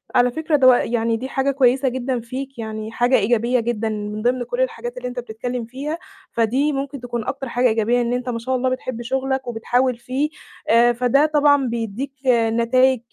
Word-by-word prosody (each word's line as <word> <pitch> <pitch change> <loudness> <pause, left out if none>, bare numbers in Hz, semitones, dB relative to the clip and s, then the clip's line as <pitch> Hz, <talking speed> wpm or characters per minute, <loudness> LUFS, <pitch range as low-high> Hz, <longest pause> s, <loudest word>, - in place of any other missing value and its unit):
على 245 0 +4
فكرة 315 +3 0
دو 255 -3 +7
يعني 230 -1 +1
دي 260 +3 -6
حاجة 270 +1 0
كويسة 265 0 +3
جدًا 255 0 -2
فيك، 255 +2 -7
يعني 220 0 -5
حاجة 245 +3 +2
إيجابية 235 +3 +2
جدًا، 225 -1 -1
من 210 0 -4
ضمن 245 +2 +1
كل - - -3
الحاجات 485 0 -3
اللي - - -4
أنت 250 0 -5
بتتكلم 240 +1 -5
فيها، 275 +7 -5 0.3
فدي 255 +6 +1
ممكن 275 -1 -4
تكون 240 -2 -4
أكتر 270 -1 -4
حاجة 245 +1 +2
إيجابية 230 +2 +2
إن 240 0 -1
أنت 250 +1 -2
ما 230 -1 -2
شاء 260 +3 -1
الله 255 0 +1
بتحب 255 -2 -4
شغلك، 265 +1 -2
وبتحاول 245 +2 0
فيه، 260 +5 -2 0.4
آآ، 235 +1 +5
فده 250 +4 +3
طبعًا 290 -3 +3
بيدّيك، 235 +3 -3 0.2
نتايج 240 +2 +3
245 Hz, 185 wpm, -21 LUFS, 235-265 Hz, 0.4 s, دو